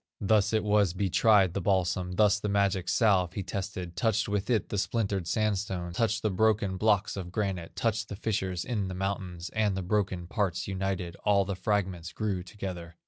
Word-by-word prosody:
Thus 100 0 +3
it 110 -1 +1
was 105 -4 +3
he 95 -2 0
tried 100 -5 +4
the 100 - -2
balsam, 90 -1 0
Thus 105 +1 +4
the 105 - -2
magic 100 -2 +1
salve 95 -6 +3
he 100 - -3
tested, 95 -2 -5
Touched 110 -1 +1
with 100 +1 -2
it 115 -3 +1
the 105 - -1
splintered 100 -5 -1
sandstone, 95 -4 -1
Touched 110 +2 0
the 110 - +1
broken 105 -1 +2
blocks 105 0 +2
of 90 -3 -6
granite, 95 -5 -3
Touched 110 -1 -1
the - - -5
fissures 95 -4 -2
in 105 -6 -1
the 95 - -5
mountains, 90 -2 -3
And 105 -3 +1
the 95 - -2
broken 95 -2 -1
parts 90 -3 -1
united, 95 -3 -3
All 100 -2 +2
the 100 0 -3
fragments 95 -4 -1
grew 100 -4 -2
together. 90 -3 -7
100 Hz, 190 wpm, -29 LUFS, 90-105 Hz, -, tried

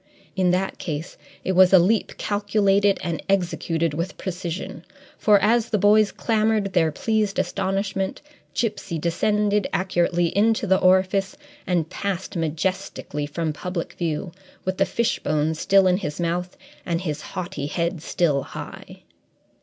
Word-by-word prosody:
In 185 -2 +2
that 185 +2 0
case, 160 -1 -5 0.3
it - - 0
was 185 0 +6
a 190 - +9
leap 200 +5 +2
calculated 205 -1 +2
and 170 -2 -2
executed 170 -4 0
with 170 +5 -3
precision, 180 -1 -5 0.3
for 210 -2 +4
as 225 +3 +2
the 215 - +1
boys 210 +1 +4
clamoured 215 -3 0
their 165 -3 +3
pleased 215 +4 0
astonishment, 195 0 -1 0.4
Gipsy 205 -6 -2
descended 205 +5 +1
accurately 175 -2 +1
into 220 +3 +3
the 190 -1 +3
orifice 190 +1 +2 0.3
and 175 -4 +1
passed 195 -1 -3
majestically 165 -2 -2
from 155 +1 -2
public 180 +2 -4
view, 165 +1 -3 0.3
with 185 0 -1
the 195 - +4
fishbone 155 -9 0
still 190 +4 +3
in 180 -1 +4
his 175 -6 -5
mouth 175 +1 -2 0.3
and 170 -1 -1
his 155 -4 -3 0.2
haughty 175 -5 -3
head 170 +1 -2
still 155 -4 +1
high. - - -9
185 Hz, 140 wpm, -23 LUFS, 170-200 Hz, 0.4 s, a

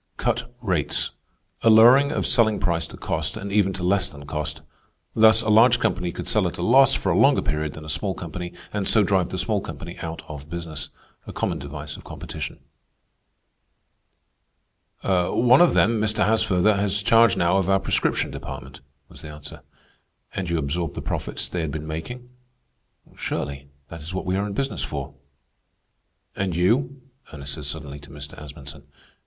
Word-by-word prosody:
A 115 - -2
lowering 120 +6 +7
of - - -1
selling 115 -4 +3
price 85 -3 0
to - - -12
cost, - - -3
and 100 0 -6
even 100 -1 +3
to 95 - -5
less 95 0 +2
than 75 -1 -12
cost. 75 0 -4 0.5
Thus, 110 +1 +6
a 110 - -1
large 115 +3 +6
company 90 -6 0
could - - -7
sell - - +2
at - - -5
a - - -3
loss 135 +2 +6
for - - 0
a - - +2
longer - - +4
period 75 -1 -2
than 75 - -10
a 75 -1 -2
small 95 +4 -2
company, 85 +1 -6 0.2
and 100 -2 -1
so 110 - +4
drive 95 -2 +1
the 95 - -4
small 95 +3 0
company - - -8
out 80 0 -6
of 75 -1 -9
business. 85 -4 -5 0.4
A - - -6
common - - -2
device 75 +1 -7
of - - -13
competition. - - -7 2.4
"One 100 - +4
of 175 - +5
them, 110 +1 +3
Mr. 110 0 +1
Haasfurther, 105 -2 +3
has 100 0 +1
charge 115 +1 +5
now 85 +2 +3
of 95 -1 0
our 95 0 +4
prescription - - 0
department," 65 -1 -8 0.3
was - - -14
the - - -9
answer. 75 0 -9 0.7
"And 90 -3 -3
you 85 - +1
absorbed 80 +1 -2
the - - -5
profits 60 - -3
they 85 +6 -3
had 80 - -2
been 75 +1 -5
making?" 120 +11 -6 0.9
"Surely. 70 0 -4 0.2
That 85 -1 -9
is 80 +5 -7
what 95 - -3
we 90 - 0
are 100 +2 0
in 100 - -5
business 135 +6 -2
for." 70 -1 -4 1.2
"And 95 -3 -2
you?" 125 +9 +1 0.3
Ernest 70 -2 -6
said 75 0 -6
suddenly 70 -1 -6
to 70 - -14
Mr. 70 0 -9
Asmunsen. 70 0 -10
90 Hz, 175 wpm, -24 LUFS, 75-110 Hz, 2.4 s, lowering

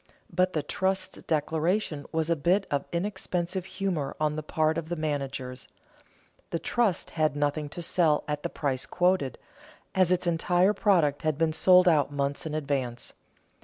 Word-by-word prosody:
But 185 +2 +2
the 155 - -1
trust's 190 +4 -2
declaration 160 +1 -1
was 160 0 0
a - - +4
bit 180 +7 +2
of 140 -1 0
inexpensive 185 -1 -2
humor 190 -6 -3
on 155 -1 +1
the 155 - -3
part 155 +1 0
of 160 -1 -8
the 175 - -1
managers; 140 -5 -4 0.8
the - - -1
trust 220 +1 0
had 155 -3 +1
nothing 145 0 -1
to 175 +3 -6
sell 160 -3 +2
at 150 -1 -2
the - - -3
price 135 -3 -2
quoted, 180 -6 +1 0.6
as 185 -2 +3
its 180 0 +1
entire 175 +3 +2
product 165 -10 +2
had 155 -3 0
been 160 -1 +1
sold 180 +2 +6
out 150 -4 +4
months 145 +3 -2
in 155 - -4
advance. 135 -5 -2
160 Hz, 165 wpm, -28 LUFS, 145-180 Hz, 0.8 s, sold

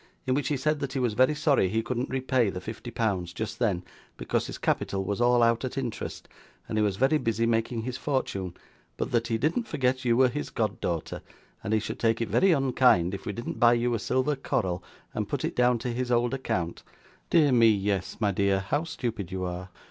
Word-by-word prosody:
In 130 - +1
which 140 0 0
he 145 - 0
said 150 +3 0
that 140 -2 -4
he 135 - -1
was 120 -4 +1
very 130 +7 +3
sorry 145 - +2
he 110 +3 0
couldn't 125 +1 -2
repay 130 -3 +1
the 90 - -5
fifty 110 +5 -7
pounds 100 -7 -1
just 110 +4 -5
then, 100 -7 +1 0.3
because - - -1
his - - -6
capital 95 -1 -1
was 100 +4 -2
all 120 0 +4
out 115 +1 +3
at 130 +1 -4
interest, 125 -5 -4 0.4
and 110 - -1
he - - +3
was 100 -2 +1
very 135 +8 +3
busy 115 -2 0
making 115 0 0
his 125 +1 -4
fortune, 100 - -2 0.4
but - - -2
that 115 -1 +1
he 115 - 0
didn't 160 - 0
forget 130 -1 0
you 120 -2 +2
were 130 0 +6
his 145 +4 -4
god 110 -2 -2
daughter, 85 -3 -3 0.4
and 100 - -3
he 110 - +3
should 110 - -5
take 115 -1 +2
it 115 - -2
very 190 0 +4
unkind 125 - +3
if 100 - -6
we - - 0
didn't 120 +4 -5
buy 120 0 +6
you 120 0 +1
a 115 - 0
silver 130 +6 0
coral 95 -9 -2 0.3
and - - -3
put - - -2
it - - -3
down 125 0 +3
to 120 +1 -3
his 125 +1 -2
old 120 +1 +2
account? 90 -10 -2 0.5
Dear 155 -4 +4
me, 115 -2 +6
yes, 100 -2 0
my 105 -2 +2
dear, 100 0 +2
how 145 - -1
stupid 115 - -4
you 95 0 -3
are! 90 +1 -4
115 Hz, 225 wpm, -27 LUFS, 100-130 Hz, 0.5 s, were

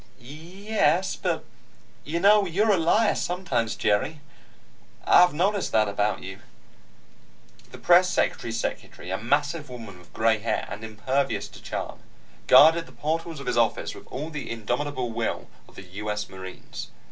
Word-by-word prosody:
"Y 120 - -19
e 170 - -12
s. 185 -2 +2
But - - -2 0.6
you 165 +3 -2
know, 200 +1 +5
you're 205 +6 +2
a - - +5
liar 205 +7 +3
sometimes, 140 -11 -2
Jerry. 105 +10 0 0.9
I've 180 0 +6
noticed 190 +6 0
that 110 -1 +4
about 105 +1 -1
you." 95 +1 -8 1.3
The - - -10
press 180 +1 +5
secretary's 115 -8 -1
secretary, 90 -5 -5
a 95 - -2
massive 145 +5 0
woman 115 -7 -9
with 90 - -19
gray 110 -1 +2
hair 115 - -2
and 105 +2 -7
impervious 110 +6 -1
to - - -14
charm, - - -5 0.5
guarded 160 +6 +7
the - - -15
portals 160 +1 -3
of 140 - -8
his - - -1
office 115 - 0
with - - -13
all 150 +5 -6
the 150 -3 -6
indomitable 120 +3 -3
will 115 0 -3 0.2
of - - -21
the - - -9
U. 100 +3 -7
S. 105 0 -2
Marines. 95 -1 -9
140 Hz, 160 wpm, -25 LUFS, 110-170 Hz, 1.3 s, guarded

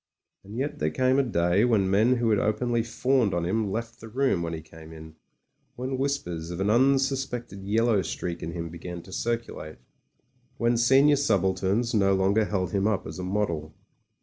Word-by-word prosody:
And 100 +3 -9
yet 140 +3 -3
there 75 - +1
came 130 - +2
a - - +4
day 90 -4 +2
when 110 -6 +3
men 110 +6 +3
who 120 -2 +1
had 105 - +3
openly 115 +3 0
fawned 120 -2 +1
on 85 -1 -1
him 105 +3 0
left 115 +3 -5
the 115 - -10
room 130 -6 +1
when 85 0 -3
he 80 - -4
came 80 0 -14
in, 80 0 -11 0.6
when 130 +1 -4
whispers 90 - -2
of 85 0 -6
an 100 +2 +1
unsuspected 130 -3 +1
yellow 110 0 +2
streak 85 -2 -4
in 85 - -5
him 85 -1 -5
began 85 +1 -8
to 95 - -14
circulate, 115 -7 -4 0.8
when 120 -1 +2
senior 135 +5 +5
subalterns 100 -1 +1
no 100 -3 +3
longer 100 +3 +2
held 95 -3 -2
him 100 0 +1
up 105 -3 -1
as - - -7
a - - -4
model. 85 -6 -2
105 Hz, 185 wpm, -26 LUFS, 90-120 Hz, 0.8 s, senior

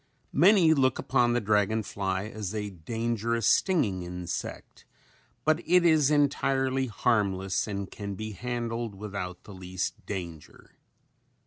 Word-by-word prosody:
Many 175 0 +6
look 130 -4 +2
upon 120 -3 +2
the 120 - +2
dragon 105 0 +1
fly 95 -2 -2
as 105 -1 -5
a 105 -1 -3
dangerous 115 +5 -2
stinging 115 - +2
insect 90 0 -6 0.6
but 155 +1 +3
it 180 0 +4
is 155 -4 +5
entirely 135 -2 +1
harmless 100 -5 0
and 100 -2 -4
can 100 -2 -6
be 110 +3 -5
handled 120 0 -4
without 95 -3 -6
the 105 - -11
least 95 0 -4
danger. 85 -6 -7
110 Hz, 125 wpm, -28 LUFS, 95-130 Hz, 0.6 s, Many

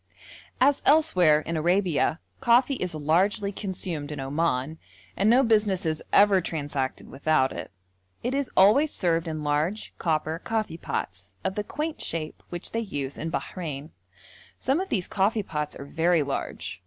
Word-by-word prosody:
As 275 +2 +4
elsewhere 185 - +4
in 165 +1 -4
Arabia, 175 -1 +1 0.2
coffee 250 +2 +4
is 180 -10 -3
largely 185 +7 +1
consumed 180 -7 -4
in 150 - -5
Oman, 140 +1 -1 0.4
and 200 +3 +2
no 250 +4 +6
business 210 -6 +2
is 155 -1 0
ever 200 -2 +5
transacted 145 -5 -3
without 140 -1 +1
it; - - -6 0.5
it 245 - -1
is 280 -1 -1
always 220 +11 +6
served 165 -2 +1
in 155 -1 -4
large, 150 +8 -1
copper 160 0 0
coffee 220 -7 -3
pots, 95 - -5
of - - -1
the 210 - -2
quaint 305 +8 -4
shape 155 -2 -3
which 175 -1 -6
they 230 - -1
use 145 -11 -4
in 165 - -4
Bahrein. 150 0 -5 0.7
Some 270 +5 +1
of 385 - -3
these 185 -6 0
coffee 210 +2 +1
pots 150 -5 -4
are 140 - -8
very 165 +2 +2
large. 140 -9 -4
170 Hz, 155 wpm, -26 LUFS, 150-210 Hz, 0.7 s, no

